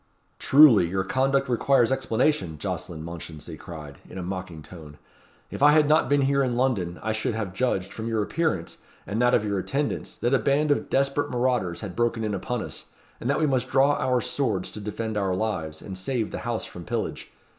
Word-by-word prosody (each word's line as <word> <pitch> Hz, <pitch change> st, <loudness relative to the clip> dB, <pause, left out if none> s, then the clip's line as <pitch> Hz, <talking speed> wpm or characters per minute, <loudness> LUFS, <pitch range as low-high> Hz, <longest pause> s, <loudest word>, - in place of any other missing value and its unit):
"Truly, 135 Hz, -, +7 dB
your 95 Hz, +2 st, -1 dB
conduct 135 Hz, +6 st, +1 dB
requires 125 Hz, 0 st, +3 dB
explanation," 125 Hz, -, 0 dB
Jocelyn 80 Hz, +2 st, -5 dB
Mounchensey 85 Hz, -2 st, -8 dB
cried, 75 Hz, -4 st, -10 dB
in -, -, -9 dB
a 95 Hz, -, -4 dB
mocking 90 Hz, -4 st, -6 dB
tone. 75 Hz, -4 st, -12 dB, 0.5 s
"If -, -, -6 dB
I 145 Hz, +1 st, +7 dB
had 155 Hz, -1 st, +5 dB
not 155 Hz, +2 st, +3 dB
been 145 Hz, 0 st, +3 dB
here 140 Hz, +1 st, +2 dB
in 125 Hz, -3 st, 0 dB
London, 105 Hz, -9 st, 0 dB
I 110 Hz, -, 0 dB
should 110 Hz, +1 st, -1 dB
have 105 Hz, -5 st, -3 dB
judged, 100 Hz, -5 st, -1 dB
from 110 Hz, 0 st, -5 dB
your 110 Hz, -2 st, 0 dB
appearance, 155 Hz, -, -2 dB, 0.3 s
and 110 Hz, +4 st, -2 dB
that 125 Hz, 0 st, +4 dB
of 105 Hz, -, +1 dB
your 100 Hz, -2 st, -1 dB
attendants, 140 Hz, +9 st, -2 dB
that 120 Hz, +3 st, 0 dB
a 135 Hz, -, +4 dB
band 140 Hz, +6 st, +2 dB
of 145 Hz, -, 0 dB
desperate 140 Hz, +1 st, +1 dB
marauders 120 Hz, -8 st, 0 dB
had 95 Hz, -5 st, -6 dB
broken 120 Hz, 0 st, 0 dB
in 105 Hz, -1 st, -1 dB
upon 115 Hz, +4 st, -3 dB
us, -, -, -8 dB, 0.3 s
and 120 Hz, -, -3 dB
that 140 Hz, -, +2 dB
we 155 Hz, -, +3 dB
must 130 Hz, -4 st, 0 dB
draw 135 Hz, +2 st, +4 dB
our 130 Hz, -3 st, +1 dB
swords 110 Hz, -8 st, -2 dB
to -, -, -7 dB
defend 110 Hz, +1 st, -4 dB
our 95 Hz, -2 st, 0 dB
lives, 80 Hz, -7 st, -3 dB
and 95 Hz, -, -7 dB
save 110 Hz, +4 st, -2 dB
the -, -, -4 dB
house -, -, -2 dB
from -, -, -9 dB
pillage. -, -, -4 dB
115 Hz, 205 wpm, -25 LUFS, 95-135 Hz, 0.5 s, Truly